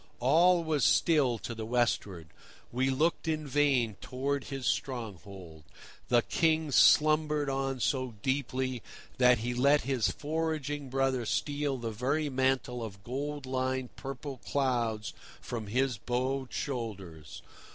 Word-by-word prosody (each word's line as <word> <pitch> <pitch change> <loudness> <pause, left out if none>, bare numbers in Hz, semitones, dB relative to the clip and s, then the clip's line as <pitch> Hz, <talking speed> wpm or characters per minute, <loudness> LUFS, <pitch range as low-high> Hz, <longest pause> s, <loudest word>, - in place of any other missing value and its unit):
All 170 +7 +4
was 155 -5 0
still 145 -8 +3
to 115 - -6
the 110 -1 -6
westward; 110 -8 -1 0.4
we 130 +2 +1
looked 155 +6 0
in 155 -1 -1
vain 135 -6 +1
towards 135 +2 -3
his 135 -2 -5
stronghold: 95 - -4 0.4
the 120 -1 +3
King 160 -2 +1
slumbered 150 0 +4
on 135 -1 -2
so 130 -1 -1
deeply 130 -2 -1 0.4
that 125 -1 +6
he 120 +2 -3
let 140 +4 +4
his 130 -5 0
foraging 150 -2 -3
brother 135 -1 0
steal 145 +4 -1
the 115 -2 -4
very 140 +7 -1
mantle 130 -2 0
of 100 -3 -8
gold 140 +4 -4
lined 130 -1 -2
purple 135 0 -6
clouds 120 -6 -1 0.3
from 115 -3 -6
his 125 0 0
bowed 130 +3 -2
shoulders. 95 - -5
130 Hz, 130 wpm, -30 LUFS, 120-145 Hz, 0.4 s, that